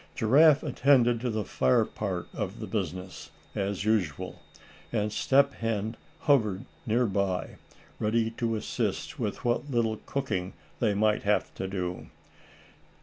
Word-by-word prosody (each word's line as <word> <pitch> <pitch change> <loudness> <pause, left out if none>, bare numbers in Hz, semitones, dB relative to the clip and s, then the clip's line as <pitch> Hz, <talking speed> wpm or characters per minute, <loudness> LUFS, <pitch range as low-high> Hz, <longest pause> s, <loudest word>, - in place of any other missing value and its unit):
Giraffe 145 +6 +5
attended 125 -4 +3
to 125 - -1
the 110 -2 -1
fire 65 -6 +3
part - - -4
of - - -4
the - - -4
business, 90 +1 -4 0.2
as 100 0 -2
usual, 100 -10 -1 0.5
and 105 -2 0
Step 140 +4 +3
Hen 110 0 -2 0.3
hovered 110 -9 +2 0.2
near 120 +3 +3
by, 100 -3 -1 0.4
ready 110 +1 +1
to 115 -1 -1
assist 105 - -3
with - - -3
what 120 +4 0
little 115 -4 +1
cooking 95 -10 -2 0.3
they 105 - +2
might 105 +1 +2
have 105 +1 +1
to 95 - -4
do. 90 -2 -4
110 Hz, 135 wpm, -28 LUFS, 100-120 Hz, 0.5 s, Giraffe